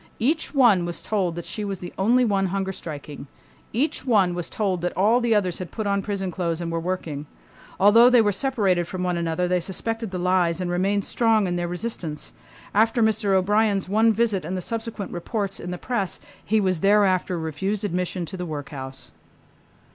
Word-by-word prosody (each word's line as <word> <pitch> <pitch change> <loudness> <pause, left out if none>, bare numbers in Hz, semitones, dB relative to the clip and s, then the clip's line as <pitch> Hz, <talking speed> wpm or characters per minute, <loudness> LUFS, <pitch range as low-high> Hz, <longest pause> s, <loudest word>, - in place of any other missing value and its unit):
Each 305 +8 0
one 230 -10 +5
was 175 0 -4
told 190 -6 -1
that 175 - -6
she 215 - -5
was 200 -1 -3
the 175 0 -8
only 240 +6 +3
one 195 -3 +1
hunger 190 +1 -2
striking. 145 -4 -8 0.4
Each 270 +8 -1
one 205 -8 +3
was 175 -1 -4
told 190 -5 -1
that 175 0 -3
all 220 +6 +4
the 235 -2 +2
others 185 -4 0
had 180 -3 -5
put 220 - -4
on 200 0 +1
prison 195 -2 -3
clothes 170 -2 -2
and 170 -1 -3
were 165 - -1
working. 165 -4 -4 0.5
Although 225 +5 +7
they 250 -1 +6
were 210 -2 +4
separated 195 -7 0
from 185 0 -4
one 180 -1 0
another 170 +1 -1
they 180 0 +2
suspected 225 +5 -3
the 185 - -4
lies 180 -2 +1
and 180 -1 -2
remained 195 +3 +1
strong 225 -3 +2
in 175 -1 -1
their 175 0 -1
resistance. 175 -5 -4 0.4
After 225 +2 +3
Mr. 215 -2 +2
O'Brien's 205 +1 +2
one 220 +4 +4
visit 215 -3 +1
and 180 +4 -3
the - - -3
subsequent 225 0 -4
reports 195 +3 -3
in 180 - -6
the 180 - -4
press 200 -3 -2 0.2
he 220 +1 +2
was 185 -4 +1
thereafter 190 -2 +3
refused 190 +6 -2
admission 180 -1 -2
to 190 +3 -7
the 180 - -4
workhouse. 135 -3 -7
190 Hz, 195 wpm, -24 LUFS, 175-215 Hz, 0.5 s, Although